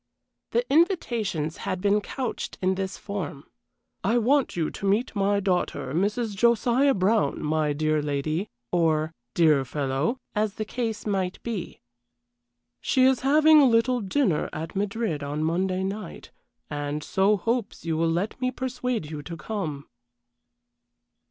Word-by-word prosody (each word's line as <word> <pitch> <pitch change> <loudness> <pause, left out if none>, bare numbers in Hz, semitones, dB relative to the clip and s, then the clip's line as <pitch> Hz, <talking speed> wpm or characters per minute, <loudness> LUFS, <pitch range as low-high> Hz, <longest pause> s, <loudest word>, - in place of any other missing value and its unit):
The 485 +1 0
invitations 230 - +1
had 185 - -3
been 205 +2 +2
couched 250 +3 -4
in 185 0 +2
this 190 0 -3
form: 180 -9 -5 0.6
"I 225 +5 +2
want 265 +4 +2
you 165 -3 -1
to - - -6
meet 215 +5 +1
my 200 0 +2
daughter, 180 -8 -1
Mrs. 210 +5 0
Josiah 240 +5 +3
Brown, 185 -6 +1
my 155 0 +1
dear 155 +1 +1
lady," 150 +6 -2 0.2
or 160 -2 +1 0.2
"dear 155 -5 +4
fellow," 140 - -1 0.2
as 210 -1 0
the 215 - -3
case 225 -1 -3
might 190 -3 -1
be. 220 -7 -5 1.0
"She 255 - +3
is 260 -1 +4
having 305 +3 +6
a - - +6
little 235 +2 +2
dinner 195 - +1
at 160 +3 -6
Madrid 200 -5 -1
on 145 +2 -3
Monday 185 +3 0
night, 195 -1 -6 0.4
and 145 +1 -3
so 195 +5 +2
hopes 230 -2 -2
you 165 -1 0
will 165 +1 +1
let 180 +9 -2
me 255 - +2
persuade 250 -9 -3
you 150 -2 -5
to 170 +2 -7
come." 155 -7 -4
195 Hz, 145 wpm, -26 LUFS, 155-230 Hz, 1.0 s, having